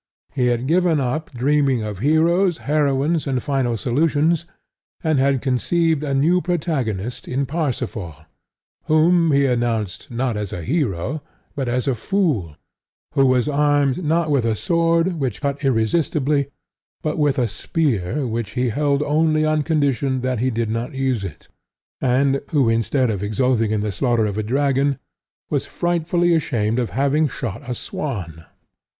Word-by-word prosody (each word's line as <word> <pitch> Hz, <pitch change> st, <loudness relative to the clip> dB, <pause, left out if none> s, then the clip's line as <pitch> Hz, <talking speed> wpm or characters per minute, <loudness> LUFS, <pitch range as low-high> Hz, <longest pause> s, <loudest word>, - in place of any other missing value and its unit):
He 125 Hz, -3 st, +1 dB
had 120 Hz, 0 st, 0 dB
given 170 Hz, +1 st, +2 dB
up 140 Hz, +4 st, -2 dB
dreaming 135 Hz, -1 st, +1 dB
of 105 Hz, -3 st, -5 dB
heroes, 165 Hz, -, +3 dB
heroines, 150 Hz, +2 st, +1 dB
and 135 Hz, -2 st, 0 dB
final 130 Hz, -5 st, 0 dB
solutions, 155 Hz, -, +1 dB, 0.6 s
and 155 Hz, -4 st, +2 dB
had 135 Hz, -1 st, +2 dB
conceived 155 Hz, +4 st, +1 dB
a 140 Hz, -2 st, -1 dB
new 170 Hz, +7 st, +3 dB
protagonist 130 Hz, -, -2 dB
in 135 Hz, +2 st, -1 dB
Parsifal, 125 Hz, -, -3 dB, 0.7 s
whom 165 Hz, +1 st, +4 dB
he 140 Hz, 0 st, +3 dB
announced, 115 Hz, -6 st, -1 dB
not 120 Hz, -1 st, -1 dB
as 105 Hz, -2 st, -4 dB
a 85 Hz, -, -5 dB
hero, 130 Hz, -, -1 dB, 0.3 s
but 135 Hz, -3 st, -2 dB
as 125 Hz, +2 st, -1 dB
a 135 Hz, -, +2 dB
fool; 120 Hz, -, -1 dB, 0.6 s
who 135 Hz, -2 st, +4 dB
was 130 Hz, 0 st, +2 dB
armed, 145 Hz, +1 st, +2 dB
not 160 Hz, 0 st, +1 dB
with 140 Hz, -4 st, +2 dB
a 115 Hz, -1 st, +1 dB
sword 170 Hz, -, +1 dB
which 130 Hz, -7 st, -2 dB
cut 140 Hz, 0 st, -3 dB
irresistibly, 140 Hz, +3 st, +1 dB, 0.6 s
but 155 Hz, 0 st, -2 dB
with 145 Hz, -2 st, +2 dB
a 125 Hz, -2 st, +2 dB
spear 125 Hz, -, -1 dB
which 115 Hz, -2 st, -3 dB
he 125 Hz, -1 st, 0 dB
held 145 Hz, +4 st, +1 dB
only 155 Hz, +1 st, +2 dB
on 155 Hz, 0 st, +2 dB
condition 140 Hz, -4 st, 0 dB
that 130 Hz, -2 st, -1 dB
he 130 Hz, +3 st, +1 dB
did 115 Hz, -2 st, -2 dB
not 115 Hz, +5 st, -3 dB
use 130 Hz, -5 st, 0 dB
it; 95 Hz, -7 st, -8 dB, 0.5 s
and 135 Hz, +2 st, +2 dB
who 140 Hz, -6 st, +2 dB
instead 115 Hz, +2 st, +1 dB
of 100 Hz, -3 st, -3 dB
exulting 115 Hz, +2 st, +1 dB
in 110 Hz, -1 st, 0 dB
the 105 Hz, 0 st, -2 dB
slaughter 120 Hz, +1 st, +1 dB
of 100 Hz, -2 st, -2 dB
a -, -, +1 dB
dragon 135 Hz, +3 st, +1 dB, 0.5 s
was -, -, -1 dB
frightfully 175 Hz, 0 st, +1 dB
ashamed 115 Hz, -7 st, 0 dB
of 120 Hz, -4 st, -1 dB
having 140 Hz, -, +1 dB
shot 120 Hz, -7 st, -5 dB
a 125 Hz, -, -2 dB
swan. 90 Hz, -, -5 dB
135 Hz, 155 wpm, -21 LUFS, 120-155 Hz, 0.7 s, whom